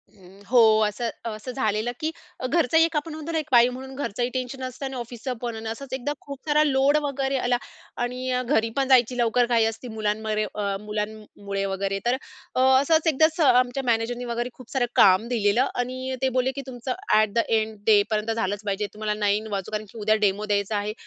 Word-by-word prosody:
हं. 190 0 -17
हो. 250 - +6 0.3
असं 210 +3 -2 0.2
असं 220 +2 -5
झालेलं 220 -2 -1
की 315 +1 -1 0.4
घरचं 320 +1 +2
एक 330 0 +3
आपण 300 +1 -3
म्हणतो 310 +1 -6
ना 325 - 0
एक 310 - -4
बाई 240 -1 +7
म्हणून 265 +1 -8
घरचंही 245 -3 -2
टेन्शन 255 +1 -4
असतं 255 +2 -5
आणि 265 0 -5
ऑफिसचं 240 +1 -5
पण 240 -2 -3
आणि 220 0 -5
असंच 260 +3 -7
एकदा 265 +3 -2
खूप 280 -1 -8
सारा 300 0 +4
लोड 280 0 +3
वगैरे 275 -1 -1
आला 245 -1 +1 0.5
आणि 250 +1 -3
अ, 250 0 +1
घरी 230 -3 +1
पण 270 -1 +2
जायची 250 -2 +4
लवकर 240 +1 +3
घाई 235 -2 +3
असते 225 +3 -4
मुलांमध्ये 215 -1 -1
अ, 200 -2 -1
मुलांमुळे 210 -1 -4
वगैरे. 195 0 -2
तर 240 +1 +3 0.4
अ, - - +1 0.2
असंच 320 +3 +2
एकदा 315 0 +5 0.3
आमच्या 250 +2 -1
मॅनेजरने 240 +1 0
वगैरे 240 +1 -2
खूप 255 -2 -15
सारं 265 -3 +1
काम 190 +4 +5
दिलेलं 235 +1 +2
आणि 255 +1 -3
ते 265 - +2
बोलले 255 +1 +1
की 280 - -4
तुमचं 250 0 -4 0.3
एट 215 -2 0
द 235 - +2
एंड 220 -1 0
डेपर्यंत 215 +1 +3
झालंच 205 -2 -2
पाहिजे. 205 +1 -1
तुम्हाला 215 0 -2
9 210 +1 +1
वाजु 195 -1 -3
कारण 215 0 -3
की - - -13
उद्या 215 +1 +3
डेमो 200 +2 0
द्यायचा 205 0 0
आहे. 205 +1 -2
240 Hz, 200 wpm, -25 LUFS, 215-260 Hz, 0.5 s, बाई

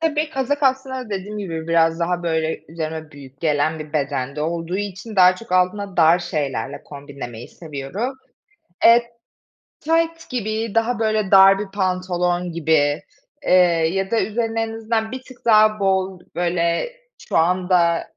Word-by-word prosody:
Tabii 310 -1 0
kazak 285 +1 -2
aslında 260 -2 0
dediğim 205 +2 -4
gibi 165 -5 -5
biraz 165 0 +2
daha 175 +1 -1
böyle 160 -1 -1
üzerime 160 -1 -5
büyük 140 -2 -14
gelen 155 0 +1
bir 155 0 -9
bedende 140 -1 -2
olduğu 165 +2 -2
için 205 +2 -6
daha 185 0 +6
çok 230 -3 -10
altında 185 +2 0
dar 165 +1 +5
şeylerle 140 -9 -3
kombinlemeyi 140 -5 -9
seviyorum. 165 - -5 0.7
Eee, 235 +1 +6 0.8
tayt 330 +1 0
gibi, 220 -3 -3
daha 230 +1 +1
böyle 215 -3 0
dar 195 0 +7
bir 210 - -4
pantolon 180 -2 -1
gibi, 155 -3 +1 0.4
eee, - - -1 0.4
ya 195 +1 -2
da 230 - +2
üzerine 225 +1 -1
en 225 0 -3
azından 225 0 -2
bir 260 - -6
tık 255 -1 -14
daha 215 -1 +5
bol 190 -1 0 0.2
böyle 170 - 0 0.4
şu - - +1
anda 175 0 +2
185 Hz, 145 wpm, -21 LUFS, 160-220 Hz, 0.8 s, dar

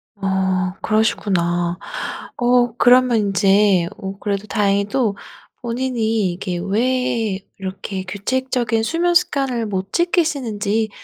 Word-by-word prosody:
어 190 -1 0
그러시구나. 175 -5 0 0.6
어 245 -1 +2
그러면 250 -1 +5
인제 195 -2 +3
어 195 0 -6
그래도 205 0 -3
다행히도 205 +2 +1 0.4
본인이 230 -5 -1
이게 180 -1 -4
왜 225 -1 0 0.2
이렇게 190 0 -5
규칙적인 235 +3 -1
수면 340 +8 +1
습관을 270 -9 +1
못 195 -1 -4
지키시는지 245 - 0
215 Hz, 240 characters per minute, -20 LUFS, 195-245 Hz, 0.6 s, 그러면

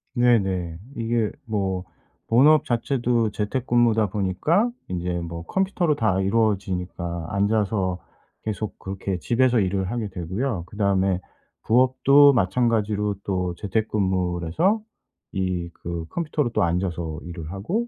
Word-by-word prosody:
네네. 95 -9 +2 0.2
이게 115 -1 0
뭐 95 -4 -1 0.4
본업 145 +7 +5
자체도 120 -2 +1
재택근무다 115 -1 +1
보니까 105 - +1 0.2
인제 90 0 -3
뭐 85 0 -6
컴퓨터로 185 -5 +1
다 95 -7 +1
이루어지니까 95 -5 -1
앉아서 100 -2 +1 0.5
계속 110 -1 -4
그렇게 95 -1 -4
집에서 120 +4 +2
일을 95 0 0
하게 115 -3 -3
되고요. 95 +3 -3
그다음에 95 -3 +1 0.4
부업도 130 +4 +5
마찬가지로 105 -1 +1
또 90 -3 -1
재택근무를 95 -4 -1
해서 195 - +2 0.5
이 90 -2 -2
그 85 -1 -5
컴퓨터로 150 -6 -1
또 110 - +1
앉아서 85 -2 -1
일을 85 -2 -7
하고 180 - -2
100 Hz, 280 characters per minute, -24 LUFS, 90-120 Hz, 0.5 s, 본업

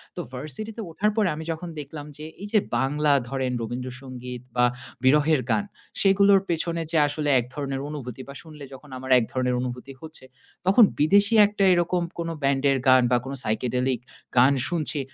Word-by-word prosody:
তো - - -4
ভার্সিটিতে 155 - -7
ওঠার 205 +6 0
পরে 215 -3 +2
আমি 160 - -6
যখন 165 +2 -6
দেখলাম 145 +1 -8
যে, 155 - -8 0.2
এইযে 210 +1 +2 0.2
বাংলা 145 +3 +2 0.2
ধরেন 130 -2 -2
রবীন্দ্রসঙ্গীত 125 +1 -6
বা, 125 0 +4 0.4
বিরহের 150 +2 +4
গান, 205 - +2 0.4
সেগুলোর 195 0 +5
পেছনে 170 0 -1
যে 165 - +1
আসলে 145 0 -2
এক 120 - -3
ধরনের 135 -2 -4
অনুভূতি 130 -4 -7
বা, 140 - -9
শুনলে 155 -3 -12
যখন 145 +3 -13
আমার 130 +1 -6
এক 120 - -1
ধরনের 125 -1 0
অনুভূতি 125 +2 -6
হচ্ছে। 155 -4 -11 0.4
তখন 195 +5 +6 0.2
বিদেশী 200 +8 +4
একটা 205 -1 -2
এরকম 175 0 +1 0.2
কোন 165 0 -2
ব্যান্ডের 135 0 +2
গান 130 -1 +6
বা, 125 - +5
কোনো 135 +1 -5
psychedelic 125 +3 -1 0.4
গান 130 +3 +6
শুনছি। 160 -3 -2
145 Hz, 165 wpm, -24 LUFS, 130-170 Hz, 0.4 s, তখন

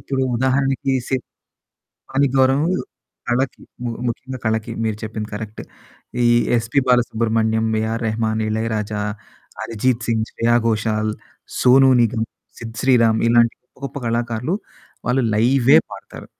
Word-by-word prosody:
ఇప్పుడు 135 -1 -2
ఉదాహరణకి 135 +1 +1 0.2
శ - - -10 1.0
కానీ 140 +1 +3
గౌరవం 135 +5 +3 0.6
కళకి. 130 +2 0 0.2
ము 120 - -1 0.2
ముఖ్యంగా 130 +2 -5
కళకి. 110 +1 -1
మీరు 110 -2 -1
చెప్పింది 110 0 -5
కరక్ట్. 110 -1 -6 0.6
ఈ - - +5 0.3
'ఎస్‌పీ 115 +4 +1
బాలసుబ్రహ్మణ్యం', 115 -2 +2
'ఏఆర్ 115 +2 -2
రెహమాన్', 110 0 -1
'ఇళయరాజా', 110 -1 -2 0.6
'అరిజీత్ 115 +1 -1
సింగ్', 110 -1 +1
'శ్రేయా 120 +1 +2
ఘోషాల్', 110 0 0 0.5
'సోనూ 130 +1 +6
నిగమ్', 110 0 0 0.3
'సిద్ 115 -1 -8
శ్రీరామ్', 115 -4 +4
ఇలాంటి 115 -1 +4
గొప్ప - - -49 0.2
గొప్ప 140 - -7
కళాకారులు, 120 +7 -1 0.5
వాళ్ళు 130 +2 +2
లైవే 125 +4 +4 0.2
పాడతారు. - - -10
115 Hz, 120 wpm, -20 LUFS, 110-130 Hz, 1.0 s, సోనూ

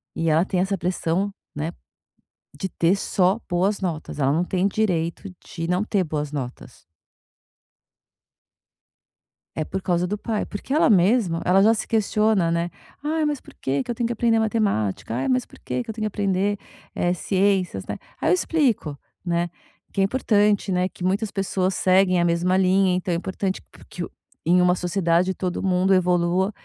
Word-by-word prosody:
E 165 - 0
ela 160 +4 +3
tem 185 -3 -1
essa 195 +1 0
pressão, 180 +2 -1 0.2
né, 155 +3 -2 0.9
de 190 - -2
ter 175 +3 +2
só 190 +1 +1
boas 190 +4 +1
notas, 160 -5 -4
ela 135 -1 +2
não 165 +4 +1
tem 185 +1 -1
o - - +4
direito 185 -3 -1 0.2
de 165 0 -5
não 180 +4 +1
ter 200 -3 +1
boas 150 -3 -3
notas. 130 -4 -6 2.8
É 155 - 0
por 190 +4 -5
causa 175 0 +1
do 210 +3 -2
pai, 215 0 -2
porque 235 +7 -5
ela 305 - +4
mesma, 190 -3 +3
ela 190 +2 +5
já 220 +3 +6
se 220 - -4
questiona, 215 -4 +2
né. 170 +1 -1 0.3
Ai 310 +1 0
mas 295 -2 0
por - - -16
que 135 0 -2
que - - -4
eu - - 0
tenho 235 -1 0
que 240 - -2
aprender 230 0 +2
matemática? 155 - 0
Ai 130 - -1
mas 255 -1 +1
por - - -18
que 245 - -3
que 225 - -15
eu - - -8
tenho 215 - -5
que - - +1
aprender, 200 0 0 0.4
eh, 175 0 +1
ciências, 185 - 0
né. 105 - -4 0.2
Aí - - +1
eu - - +6
explico, 220 - +1 0.3
né, 170 0 0 0.4
que 195 - +1
é - - +5
importante, 205 -3 +2
né, 180 +1 +1
que - - -10
muitas 200 +4 0
pessoas 190 -1 -1
seguem 185 -1 +3
a 175 - +3
mesma 175 +2 +2
linha, 190 0 +3
então 180 -1 -1
é 170 - +1
importante 190 +1 -3
po - - -17
que 180 - -6
o - - -7 0.3
em 180 +2 +4
uma 180 0 +4
sociedade 180 0 +1
todo 180 0 -3
mundo 190 0 +3
evolua 180 +1 +2
185 Hz, 185 wpm, -23 LUFS, 170-205 Hz, 2.8 s, já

